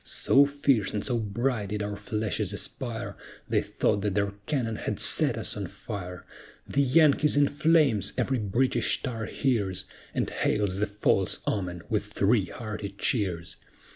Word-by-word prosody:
So 140 +1 +4
fierce 140 -8 +1
and 105 - -2
so 120 -3 +1
bright 110 0 -1
did 105 0 -2
our 105 0 -3
flashes 105 -2 -2
aspire, 120 +2 -4 0.3
They - - +2
thought 100 - 0
that 100 -1 -1
their 100 -1 +1 0.2
cannon 120 -7 -1
had - - -3
set - - +2
us - - -2
on - - -4
fire, 90 -3 -7 0.4
"The 140 - +1
Yankee's 150 +1 +4
in 145 0 +5
flames!" 150 - +3
every 130 -2 +1
British 115 +5 +1
tar 115 -5 -3
hears, 100 -8 -1 0.3
And - - +1
hails 100 -3 0
the 105 +2 +1
false 100 -2 +1
omen 90 -4 -2
with 105 -2 0
three 105 0 +2
hearty 105 +1 -6
cheers. 95 -9 -1
105 Hz, 155 wpm, -27 LUFS, 100-130 Hz, 0.4 s, in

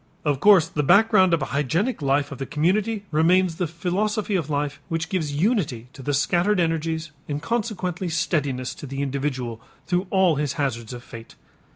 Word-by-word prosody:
Of 145 -3 +1
course 190 -3 +6
the 150 - -2
background 195 +3 +5
of 165 -4 +2
a - - -6
hygienic 165 - 0
life 140 +1 +1
of 140 - -7
the 135 - -4
community 200 +7 0
remains 165 +2 +3
the 180 - -1
philosophy 200 +6 -1
of 165 -5 -1
life 145 -1 -2
which 165 0 -2
gives 155 -7 -2
unity 150 - 0
to 135 - -11
the 145 - -2
scattered 175 +7 +2
energies 165 -1 -1 0.2
and 145 0 -2
consequently 195 -3 -2
steadiness 145 -6 -1
to 145 - -7
the 135 +1 -3
individual 130 -4 -3 0.2
through 180 +1 0
all 185 -5 +3
his 145 -2 -1
hazards 125 -6 -2
of 120 0 -8
fate. 115 -1 -11
160 Hz, 180 wpm, -24 LUFS, 140-185 Hz, 0.2 s, course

